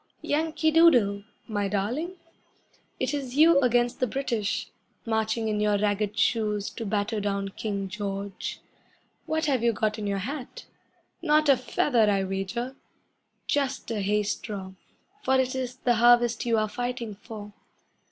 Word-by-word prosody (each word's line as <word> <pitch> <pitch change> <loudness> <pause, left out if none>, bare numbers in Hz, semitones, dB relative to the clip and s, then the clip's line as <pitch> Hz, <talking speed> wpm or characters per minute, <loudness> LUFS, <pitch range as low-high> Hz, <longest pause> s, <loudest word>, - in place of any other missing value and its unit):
"Yankee 315 +1 +1
Doodle," 240 -12 +5 0.2
my 205 -2 -1
Darling! 235 - -2 0.8
It - - -1
is 265 -3 -4
you 315 -1 +7
against 245 -2 +2
the 255 - +2
British, 235 -5 -2 0.3
Marching 220 0 0
in 210 -1 0
your 210 -1 +2
ragged 210 0 0
shoes 210 -2 +1
to 230 -3 -6
batter 205 +1 -1
down 200 -1 -2
King 200 -1 -3
George. 200 0 -5 0.7
What 315 +1 0
have 270 -5 +1
you 235 -1 +3
got 215 0 -1
in 205 - -3
your 200 0 0
hat? 275 -1 -6 0.6
Not 305 -2 +3
a 275 - +8
feather, 245 -3 +2
I 195 -1 +2
wager. 195 +7 -3 0.7
Just 275 -4 -1
a 215 -2 -1
hay 210 +2 +1
straw, 200 -2 -4 0.5
for 265 - +2
it 255 -1 +1
is 255 -1 -3
the 250 -1 +1
harvest 240 0 +4
you 230 -1 +3
are 215 0 +1
fighting 245 0 -4
for. 210 0 -10
225 Hz, 150 wpm, -27 LUFS, 205-255 Hz, 0.8 s, a